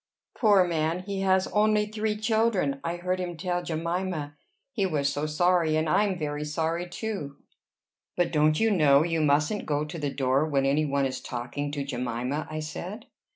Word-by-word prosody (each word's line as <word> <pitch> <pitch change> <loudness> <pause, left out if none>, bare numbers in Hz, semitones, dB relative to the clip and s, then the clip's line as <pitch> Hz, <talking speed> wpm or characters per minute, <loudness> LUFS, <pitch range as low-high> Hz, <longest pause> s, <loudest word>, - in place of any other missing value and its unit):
"Poor 205 -5 +5
man! 165 0 -1
he 195 0 -4
has 190 -1 +3
only 210 0 +3
three 215 0 -2
children. 220 -10 +1
I 170 +1 -2
heard 180 +1 -2
him 175 -2 -4
tell 175 +1 -1
Jemima. 170 -2 -3 0.4
He 220 -7 -1
was 145 -5 0
so 145 +2 -2
sorry! 165 0 +2
And 155 +1 +1
I'm 200 +4 +2
very 150 -2 -3
sorry, 165 +3 -2
too." 180 -8 -5 0.8
"But 175 -1 +1
don't 155 0 +3
you 225 0 +3
know 150 -6 +5
you 165 -1 0
mustn't 150 +7 +1
go 150 0 0
to 165 +2 -7
the 145 -1 -1
door 135 +1 +1
when 140 -3 +1
any 145 +3 +2
one 140 -1 +1
is 130 -1 -3
talking 125 +4 -4
to 145 -1 -2
Jemima?" 125 +2 -3
I 155 0 -4
said. 180 +8 -6
160 Hz, 180 wpm, -27 LUFS, 145-185 Hz, 0.8 s, Poor